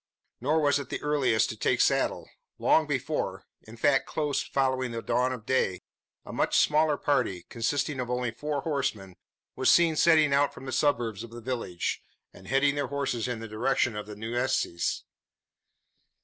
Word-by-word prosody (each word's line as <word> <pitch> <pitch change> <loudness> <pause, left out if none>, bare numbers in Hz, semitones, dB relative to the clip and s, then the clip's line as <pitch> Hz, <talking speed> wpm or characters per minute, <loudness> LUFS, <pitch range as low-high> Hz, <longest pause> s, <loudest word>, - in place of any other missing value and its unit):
Nor 150 +6 +1
was 145 -1 +3
it 140 - -7
the - - -3
earliest 130 -7 +2
to - - -4
take - - 0
saddle. - - +1 0.3
Long - - +3
before - - -2 0.2
in 115 +2 -11
fact 135 +4 +2
close 150 -2 -1
following 130 -2 0
the 115 -1 -4
dawn 125 +1 +1
of 125 -4 -6
day 95 -8 0 0.4
a - - -8
much - - +1
smaller 150 0 +3
party, 115 -11 0
consisting 140 +4 -1
of 125 -1 -3
only 125 -1 -1
four 145 +4 -3
horsemen, 130 - -3 0.4
was 130 - +2
seen 170 -2 +5
setting 155 -3 +4
out 140 +1 +2
from - - -10
the 130 - -5
suburbs 120 -6 0
of 120 - -9
the 120 +1 -9
village, 115 -7 -3 0.3
and 95 - -15
heading 135 +1 +3
their 145 -1 -2
horses 135 -4 -2
in 120 -2 -4
the 115 - -6
direction 120 +1 0
of 105 0 -5
the 105 - -8
Nueces. 115 -5 -1
130 Hz, 175 wpm, -28 LUFS, 115-145 Hz, 0.4 s, seen